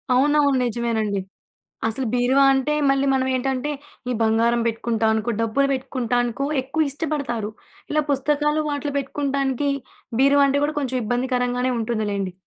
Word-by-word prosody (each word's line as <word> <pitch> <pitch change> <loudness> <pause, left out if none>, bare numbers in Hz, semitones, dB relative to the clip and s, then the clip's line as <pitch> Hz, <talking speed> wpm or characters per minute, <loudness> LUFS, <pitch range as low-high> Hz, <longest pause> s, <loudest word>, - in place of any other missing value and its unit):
అవునవును. 285 +1 +3
నిజమేనండి. 220 -4 -1 0.7
అసలు 245 +4 -2
బీరువా 250 +3 +3
అంటే, 270 +3 +1 0.2
మళ్లీ 275 0 +2
మనం 260 -1 +1
ఏంటంటే, 265 +2 -1 0.4
ఈ - - +1
బంగారం 230 +2 +2
పెట్టుకుంటాం 225 -1 0
అనుకో, 220 +2 -1
డబ్బులు 230 +5 +2
పెట్టుకుంటాం 255 -2 -1
అనుకో, 240 +3 -3 0.2
ఎక్కువ 285 +4 -1
ఇష్టపడతారు. 275 -8 -3 0.4
ఇలా 305 0 +2
పుస్తకాలు 295 +2 +1
వాటిలో 290 0 -3
పెట్టుకుంటానికి 275 0 -1 0.5
బీరువా 280 +1 +5
అంటే 275 +1 +2
కూడా 305 +1 -1
కొంచెం 260 -3 -2
ఇబ్బందికరంగానే 250 +1 0
ఉంటుందిలెండి. 210 -4 -2
260 Hz, 130 wpm, -22 LUFS, 235-280 Hz, 0.7 s, బీరువా